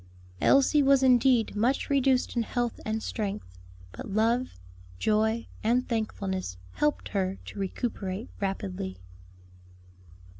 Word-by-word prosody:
Elsie 275 +2 +5
was 275 -1 +4
indeed 250 -3 +4
much 240 +6 +1
reduced 270 -3 +2
in 235 - +2
health 240 +1 -2
and 220 0 -2
strength; 200 - -4 0.3
but - - -8
love, 225 - +1 0.4
joy, 220 - +1 0.2
and 245 +3 +2
thankfulness 195 - -2
helped 295 0 0
her 190 -1 -1
to - - -8
recuperate 195 0 -3
rapidly. 95 - -3
220 Hz, 110 wpm, -28 LUFS, 195-250 Hz, 0.4 s, Elsie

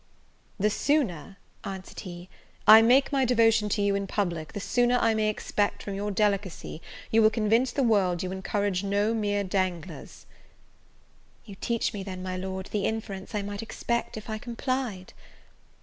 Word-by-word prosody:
"The 210 +2 +2
sooner," 200 - 0 0.3
answered 190 -1 -7
he, 175 -2 -8 0.4
"I 220 +1 +10
make 250 +4 +4
my 275 -2 +2
devotion 225 -3 +3
to 205 0 0
you 200 0 +2
in 200 0 -1
public, 170 -7 -2
the - - -4
sooner 245 +4 +2
I 230 -1 +3
may 215 -1 +1
expect, 205 -1 -1
from 200 - -5
your 200 +1 -3
delicacy, 200 -5 -1 0.3
you 225 - +5
will 215 - +6
convince 225 +3 +2
the 275 - 0
world 190 -6 +2
you 185 - -3
encourage 195 0 -1
no 205 +2 +1
mere 205 -2 0
danglers." 180 -5 -3 1.2
"You 205 - -10
teach 230 +4 -1
me, 205 - -4
then, 185 -1 -6
my 185 0 -3
Lord, 190 0 -4
the 205 -2 0
inference 210 -2 -4
I 205 - -1
might 205 0 -5
expect, 235 +1 -3
if 215 - -8
I 215 -1 -4
complied." 240 -5 -3
205 Hz, 165 wpm, -27 LUFS, 190-225 Hz, 1.2 s, I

